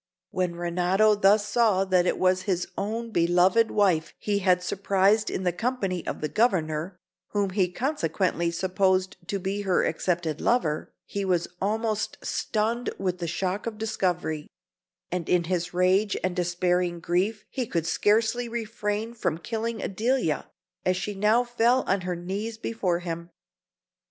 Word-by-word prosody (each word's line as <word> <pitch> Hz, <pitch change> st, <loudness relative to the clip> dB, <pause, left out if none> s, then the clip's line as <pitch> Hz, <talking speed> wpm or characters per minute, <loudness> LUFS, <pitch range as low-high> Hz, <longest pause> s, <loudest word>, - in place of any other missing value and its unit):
When 180 Hz, -2 st, -1 dB
Renato 180 Hz, +5 st, +2 dB
thus 205 Hz, +1 st, +4 dB
saw 210 Hz, -3 st, +3 dB
that 185 Hz, -1 st, +3 dB
it -, -, +1 dB
was 185 Hz, 0 st, +2 dB
his 180 Hz, -1 st, 0 dB
own 225 Hz, +3 st, -3 dB
beloved 180 Hz, +6 st, +4 dB
wife 175 Hz, -6 st, +1 dB
he 205 Hz, -1 st, -1 dB
had 180 Hz, -2 st, +3 dB
surprised 200 Hz, +3 st, +2 dB
in 190 Hz, -, -3 dB
the 180 Hz, -, +2 dB
company 195 Hz, -4 st, -2 dB
of -, -, -4 dB
the 155 Hz, -, 0 dB
Governor, 180 Hz, -5 st, 0 dB, 0.4 s
whom 200 Hz, -2 st, +1 dB
he 185 Hz, -1 st, +2 dB
consequently 180 Hz, -, 0 dB
supposed 185 Hz, +2 st, +1 dB
to 200 Hz, -, -1 dB
be 195 Hz, +2 st, -2 dB
her 190 Hz, -3 st, +2 dB
accepted 170 Hz, -4 st, -1 dB
lover, 165 Hz, -11 st, +1 dB
he 200 Hz, -, -3 dB
was 180 Hz, -3 st, +1 dB
almost 215 Hz, +1 st, -1 dB
stunned 230 Hz, +3 st, -1 dB
with 180 Hz, -2 st, -2 dB
the 170 Hz, -, -3 dB
shock 185 Hz, +5 st, -2 dB
of 225 Hz, -, -3 dB
the 220 Hz, +1 st, -4 dB
discovery; 175 Hz, -7 st, -1 dB, 0.6 s
and 180 Hz, -2 st, -3 dB
in 180 Hz, -1 st, +3 dB
his 175 Hz, 0 st, -2 dB
rage 185 Hz, +3 st, +2 dB
and 185 Hz, -1 st, 0 dB
despairing 175 Hz, 0 st, 0 dB
grief, 185 Hz, +6 st, 0 dB
he 255 Hz, -4 st, -2 dB
could 170 Hz, -5 st, -1 dB
scarcely 225 Hz, +6 st, +2 dB
refrain 225 Hz, -1 st, -3 dB
from 175 Hz, -9 st, -1 dB
killing 225 Hz, +4 st, -3 dB
Adelia, 220 Hz, -, 0 dB, 0.3 s
as 185 Hz, 0 st, +1 dB
she 200 Hz, +2 st, -3 dB
now 210 Hz, +5 st, +3 dB
fell 240 Hz, +1 st, +2 dB
on 195 Hz, 0 st, 0 dB
her 180 Hz, 0 st, -2 dB
knees 200 Hz, +6 st, -4 dB
before 195 Hz, -7 st, -1 dB
him. 170 Hz, -1 st, -5 dB
190 Hz, 155 wpm, -26 LUFS, 175-215 Hz, 0.6 s, thus